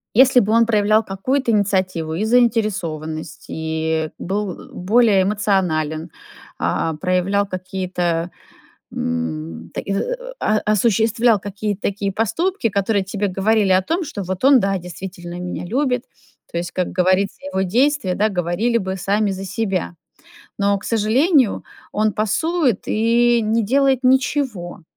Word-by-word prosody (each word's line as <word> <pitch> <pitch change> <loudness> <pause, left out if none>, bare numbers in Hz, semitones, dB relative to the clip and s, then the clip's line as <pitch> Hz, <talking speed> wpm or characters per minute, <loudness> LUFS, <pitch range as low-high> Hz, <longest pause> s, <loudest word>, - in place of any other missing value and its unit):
если 260 +1 +6
бы 210 0 0
он 230 0 +5
проявлял 215 0 +3
какую-то 235 +6 -1
инициативу 185 -6 0
и 195 +6 -1
заинтересованность, 210 -10 0
и 160 0 -2
был, 200 +1 -2
э, - - -14
более 205 +1 +3
эмоционален, 175 -6 0 0.5
а, 160 - -1
проявлял 185 +4 +1
какие-то, 180 -2 -2 0.6
м, 80 0 -4
так - - -4
и - - -1
и - - -1 0.4
а 215 0 +1
а 210 - +2
осуществлял 225 +1 +3
какие-то 205 +1 -4
такие 200 0 -1
поступки, 230 - 0
которые 200 0 0
тебе 200 +1 -2
говорили 200 +1 +2
о 185 - +4
том, 335 - -1
что 205 -9 -5
вот 185 +5 -5
он, 275 -1 +7
да, 195 -2 0
действительно 175 0 -8
меня 180 0 -5
любит. 250 +4 0 0.5
То - - -4
есть, 175 +1 -3
как 180 -1 -2
говорится, 185 +2 +1
его 190 0 0
действия, 245 +1 +1
да, 215 +2 +2
говорили 190 +6 0
бы 190 -3 -3
сами 200 +2 0
за 190 0 -5
себя. 190 - -2 0.6
Но, 200 0 +2
к - - -15
сожалению, 240 - +2 0.3
он 215 0 +1
пасует 260 - 0
и 235 +2 +3
не 220 +1 +1
делает 270 +3 +2
ничего, 255 -8 0
200 Hz, 140 wpm, -20 LUFS, 180-230 Hz, 0.6 s, он